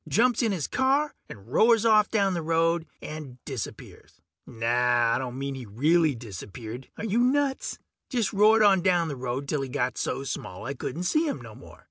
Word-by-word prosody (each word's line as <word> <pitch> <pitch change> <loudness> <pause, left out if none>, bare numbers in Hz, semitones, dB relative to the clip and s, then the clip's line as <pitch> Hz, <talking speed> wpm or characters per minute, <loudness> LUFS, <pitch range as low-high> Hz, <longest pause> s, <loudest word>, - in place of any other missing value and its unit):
Jumps 240 +2 +3
in 230 -3 +1
his 175 -7 -2
car 275 +3 +1 0.2
and 100 -1 -11
roars 225 - +4
off 215 -2 +5
down 200 -3 +2
the 170 - -2
road 165 +1 +1 0.2
and 150 -5 -7
disappears. 130 -6 -8 0.3
Naw, 120 0 +2
I 120 - +1
don't 130 -1 -5
mean 140 0 -3
he 130 -4 -8
really 150 +7 +2
disappeared 115 +3 -8
are - - -4
you 220 +2 +1
nuts? 265 +2 +1 0.3
Just 240 -6 -1
roared 215 +2 +5
on 195 -3 +5
down 175 -3 +2
the 140 - -4
road 130 +2 -4
till 145 0 -1
he 135 - -4
got 125 -1 -2
so 135 - -2
small 110 -7 -6
I 135 - -3
couldn't 160 +5 -5
see 310 - +1
him 285 - -2
no - - -11
more. - - -14
160 Hz, 195 wpm, -26 LUFS, -, 0.3 s, off